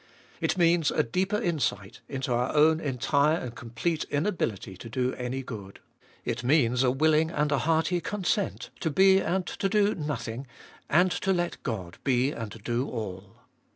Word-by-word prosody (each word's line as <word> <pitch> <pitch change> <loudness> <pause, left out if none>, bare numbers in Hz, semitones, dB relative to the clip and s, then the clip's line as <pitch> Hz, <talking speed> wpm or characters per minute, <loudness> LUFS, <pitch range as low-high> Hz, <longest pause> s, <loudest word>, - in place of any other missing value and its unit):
It - - 0
means 170 -3 +4
a - - +2
deeper 190 - 0
insight 135 - -2
into 130 -2 -2
our 125 +4 0
own 155 +1 +5
entire 145 +2 +2
and 125 -7 -5
complete 120 +9 -2
inability 145 - -2
to 115 - -9
do 125 +2 0
any 125 +2 -4
good. 100 -6 -8 0.5
It 120 0 -2
means 125 -2 +3
a 130 - +4
willing 155 +4 +3
and 150 -2 0
a 140 - +2
hearty 165 +2 +1
consent 205 +1 -2
to 160 - 0
be 190 +5 +5
and 185 0 0
to 195 - -2
do 210 0 +3
nothing, 135 -5 -4 0.4
and 180 +4 +4
to 195 +2 0
let 175 -2 -1
God 95 - -5
be 130 0 +2
and 115 -6 -5
do 120 +4 -1
all. 95 -4 -7
145 Hz, 165 wpm, -28 LUFS, 120-170 Hz, 0.5 s, own